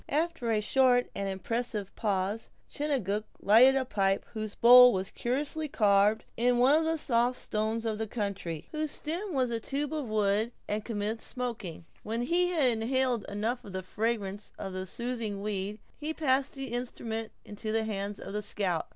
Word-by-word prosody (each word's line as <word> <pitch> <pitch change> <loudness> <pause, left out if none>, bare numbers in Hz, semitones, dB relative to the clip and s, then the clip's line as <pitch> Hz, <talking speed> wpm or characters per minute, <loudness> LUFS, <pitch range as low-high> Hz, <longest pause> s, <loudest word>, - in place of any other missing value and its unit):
After 310 -5 -1
a 215 -2 +2
short 250 +2 +3
and 200 0 -3
impressive 210 +1 -3
pause, 205 0 -1 0.2
Chingachgook 220 -9 -1
lighted 240 +6 +6
a 265 -1 +1
pipe 195 -5 +1
whose 215 -2 -5
bowl 250 +1 +9
was 190 0 -2
curiously 290 +5 -2
carved 210 -3 +3
in 245 +1 +2
one 260 +4 +5
of 320 +1 +2
the 325 0 +1
soft 245 -3 +1
stones 220 +2 -2
of 220 -1 -1
the 220 - -2
country, 200 -7 -4
and 305 - -2
whose 310 - -1
stem 340 +8 -3
was 255 -2 +1
a 230 - -1
tube 280 +5 -3
of 295 -7 -3
wood, 215 +2 +1
and 210 +1 -2
commenced 220 0 -3
smoking. 230 -10 -5 0.2
When 230 +2 -2
he 350 +7 +2
had 300 -8 +3
inhaled 240 0 0
enough 220 +5 -2
of 200 - -10
the 185 0 -3
fragrance 205 0 -2
of 190 - -5
the 185 0 -4
soothing 230 -2 -3
weed, 205 0 -3 0.2
he 310 +1 -3
passed 275 -2 +1
the 270 -1 -5
instrument 230 -2 -4
into 210 +1 -5
the 225 0 +1
hands 205 -1 -3
of - - -8
the 210 - -1
scout. 195 -5 -1
225 Hz, 180 wpm, -29 LUFS, 205-255 Hz, 0.2 s, bowl